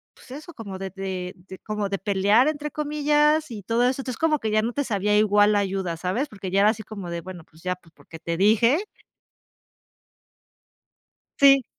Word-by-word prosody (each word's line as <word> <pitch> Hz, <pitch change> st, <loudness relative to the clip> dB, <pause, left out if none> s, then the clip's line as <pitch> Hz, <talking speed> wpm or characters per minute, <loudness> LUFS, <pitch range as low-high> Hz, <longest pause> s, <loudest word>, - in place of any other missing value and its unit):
pues -, -, -17 dB
eso, 305 Hz, +5 st, -9 dB
como 200 Hz, -8 st, -8 dB
de 195 Hz, 0 st, -4 dB
de 185 Hz, -2 st, -4 dB
de 185 Hz, +1 st, -13 dB
como 210 Hz, -2 st, -3 dB
de 195 Hz, -1 st, -2 dB
"pelear" 205 Hz, +5 st, +3 dB
entre 300 Hz, -1 st, -2 dB
comillas 300 Hz, 0 st, +1 dB
y 210 Hz, -3 st, -6 dB
todo 235 Hz, +5 st, +2 dB
eso, 265 Hz, +1 st, -1 dB
entonces 255 Hz, -3 st, -5 dB
como 315 Hz, -2 st, +2 dB
que 220 Hz, -, -2 dB
ya 215 Hz, 0 st, +3 dB
no 235 Hz, +1 st, -2 dB
te 285 Hz, -, -1 dB
sabía 210 Hz, -2 st, 0 dB
igual 205 Hz, 0 st, +4 dB
la 205 Hz, -, +3 dB
ayuda, 190 Hz, -4 st, -2 dB
¿sabes? 190 Hz, -, -2 dB
Porque 195 Hz, -3 st, -7 dB
ya 195 Hz, +1 st, +3 dB
era 210 Hz, -, +6 dB
así 215 Hz, 0 st, -2 dB
como 200 Hz, -4 st, -8 dB
de, 170 Hz, -, -4 dB
bueno, 180 Hz, -2 st, -9 dB
pues 160 Hz, +1 st, -21 dB
ya, 180 Hz, 0 st, -1 dB
pues 165 Hz, -2 st, -24 dB
porque 165 Hz, -, -13 dB
te 170 Hz, 0 st, -3 dB
dije 230 Hz, -, +3 dB, 2.6 s
Sí. 275 Hz, -1 st, +7 dB
210 Hz, 200 wpm, -24 LUFS, 190-265 Hz, 2.6 s, Sí